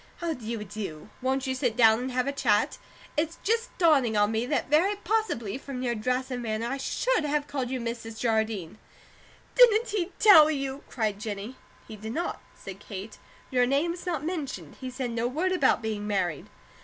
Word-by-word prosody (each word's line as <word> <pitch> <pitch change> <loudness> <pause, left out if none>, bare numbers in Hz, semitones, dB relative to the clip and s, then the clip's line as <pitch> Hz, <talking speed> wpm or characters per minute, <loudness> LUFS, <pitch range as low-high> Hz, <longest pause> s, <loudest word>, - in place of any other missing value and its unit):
How 340 -2 -2
do 250 - -11
you 225 -1 -3
do? 195 -4 -7
Won't 265 +1 0
you 260 - -1
sit 250 -3 -1
down 225 -2 +6
and 255 +1 -3
have 250 0 0
a 280 - 0
chat? 225 -7 +1 0.4
It's 320 +2 -1
just 460 +4 +1
dawning 275 - +4
on 205 +1 +3
me 225 +2 -1
that 290 - 0
very 335 +9 +3
possibly, 355 - -1
from 265 -2 -6
your 240 -1 0
dress 250 +4 -1
and 250 -1 -3
manner, 220 -1 -2
I 270 +3 -2
SHOULD 485 - 0
have 295 0 0
called 275 -4 -3
you 260 0 -2
Mrs. 230 -1 -5
Jardine." 220 -5 -1 0.7
"Didn't 470 -2 +6
he 390 -4 -1
tell 325 -8 +8
you?" 275 -2 -3
cried 215 -4 -1
Jennie. 210 +2 -5 0.3
"He 215 - -9
did 220 +2 -6
not," 345 +5 -3
said 195 0 -9
Kate. 205 +1 -8 0.3
"Your 250 -1 +3
name 285 +6 +1
was 350 +1 -8
not 315 -5 -2
mentioned. 280 - -5
He 260 - -4
said 255 -1 -4
no 230 +1 0
word 325 +9 0
about 280 -9 +3
being 210 -2 -3
married." 185 -7 -1
255 Hz, 195 wpm, -27 LUFS, 220-300 Hz, 0.7 s, tell